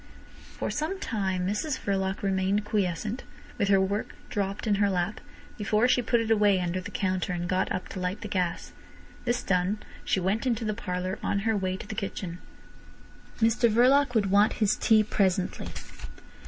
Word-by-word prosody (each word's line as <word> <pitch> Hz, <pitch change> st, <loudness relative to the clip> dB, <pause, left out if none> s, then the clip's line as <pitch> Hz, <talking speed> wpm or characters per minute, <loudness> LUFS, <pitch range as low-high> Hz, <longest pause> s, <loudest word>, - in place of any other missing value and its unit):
For -, -, -2 dB
some 315 Hz, +6 st, -2 dB
time 190 Hz, -, -1 dB
Mrs 260 Hz, +9 st, -1 dB
Verloc 195 Hz, -1 st, -1 dB
remained 195 Hz, +1 st, +1 dB
quiescent, 210 Hz, +3 st, -1 dB, 0.4 s
with 200 Hz, -, +2 dB
her 195 Hz, -1 st, +5 dB
work 200 Hz, +2 st, -1 dB, 0.2 s
dropped 200 Hz, 0 st, -2 dB
in 205 Hz, -2 st, +2 dB
her 200 Hz, -, +4 dB
lap, 185 Hz, +2 st, -1 dB, 0.4 s
before 215 Hz, +3 st, +2 dB
she 250 Hz, 0 st, +3 dB
put 235 Hz, +1 st, +2 dB
it 225 Hz, -1 st, -1 dB
away 205 Hz, -3 st, +4 dB
under 180 Hz, +1 st, -1 dB
the -, -, -7 dB
counter 185 Hz, -2 st, -1 dB
and 175 Hz, 0 st, -2 dB
got 185 Hz, +1 st, 0 dB
up 185 Hz, -, -2 dB
to 190 Hz, -, -6 dB
light 180 Hz, +2 st, -2 dB
the 210 Hz, -, -5 dB
gas. 185 Hz, -3 st, -2 dB, 0.5 s
This 245 Hz, 0 st, 0 dB
done, 185 Hz, +2 st, +1 dB, 0.3 s
she -, -, +1 dB
went 200 Hz, +7 st, 0 dB
into 230 Hz, -2 st, 0 dB
the 215 Hz, -, 0 dB
parlour 185 Hz, -2 st, -3 dB
on 200 Hz, -, 0 dB
her 225 Hz, -1 st, +2 dB
way 185 Hz, -2 st, -1 dB
to -, -, -8 dB
the 215 Hz, -, -6 dB
kitchen. 185 Hz, -4 st, -4 dB, 1.0 s
Mr 230 Hz, +1 st, +4 dB
Verloc 255 Hz, +3 st, +4 dB
would 200 Hz, -3 st, +2 dB
want 205 Hz, +2 st, +5 dB
his 210 Hz, -3 st, +2 dB
tea 220 Hz, -2 st, +4 dB
presently. 190 Hz, -3 st, 0 dB
200 Hz, 180 wpm, -28 LUFS, 185-220 Hz, 1.0 s, her